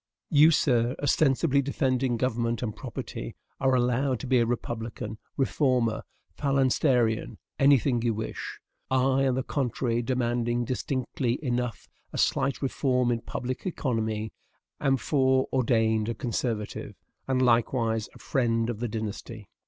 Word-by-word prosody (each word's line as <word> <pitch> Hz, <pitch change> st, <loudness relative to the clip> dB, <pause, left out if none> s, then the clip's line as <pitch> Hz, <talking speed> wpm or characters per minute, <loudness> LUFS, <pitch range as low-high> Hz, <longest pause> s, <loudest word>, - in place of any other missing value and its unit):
You, 155 Hz, 0 st, +7 dB
sir, 125 Hz, -5 st, +2 dB
ostensibly 140 Hz, 0 st, +2 dB
defending 130 Hz, -3 st, 0 dB
government 115 Hz, -1 st, -1 dB
and 110 Hz, -3 st, -3 dB
property, 110 Hz, -, -6 dB, 0.2 s
are 130 Hz, -1 st, +3 dB
allowed 125 Hz, +1 st, +1 dB
to -, -, -5 dB
be 130 Hz, -1 st, +3 dB
a 115 Hz, -, +2 dB
republican, 115 Hz, -2 st, -4 dB, 0.2 s
reformer, 130 Hz, -4 st, +1 dB, 0.3 s
phalansterian, 130 Hz, -4 st, +1 dB, 0.2 s
any 140 Hz, 0 st, +6 dB
thing 120 Hz, 0 st, 0 dB
you 115 Hz, -2 st, 0 dB
wish; 110 Hz, +1 st, -5 dB, 0.3 s
I, 130 Hz, +1 st, +3 dB
on 130 Hz, -, +1 dB
the 130 Hz, -, -1 dB
contrary, 125 Hz, -3 st, -1 dB
demanding 120 Hz, -1 st, 0 dB
distinctly 130 Hz, 0 st, -2 dB
enough 125 Hz, -1 st, -2 dB, 0.2 s
a -, -, -6 dB
slight 140 Hz, +1 st, +1 dB
reform 125 Hz, -2 st, +1 dB
in 115 Hz, -1 st, -1 dB
public 130 Hz, +8 st, -4 dB
economy, 110 Hz, -9 st, -2 dB, 0.5 s
am 135 Hz, -1 st, +2 dB
foreordained 125 Hz, -5 st, +2 dB
a 115 Hz, -, -2 dB
conservative, 115 Hz, -1 st, -3 dB, 0.3 s
and 130 Hz, -1 st, +1 dB
likewise 115 Hz, -2 st, +2 dB
a -, -, -11 dB
friend 115 Hz, -2 st, 0 dB
of 110 Hz, -, -7 dB
the 120 Hz, -, -1 dB
dynasty. 110 Hz, -1 st, -6 dB
125 Hz, 130 wpm, -27 LUFS, 115-130 Hz, 0.5 s, You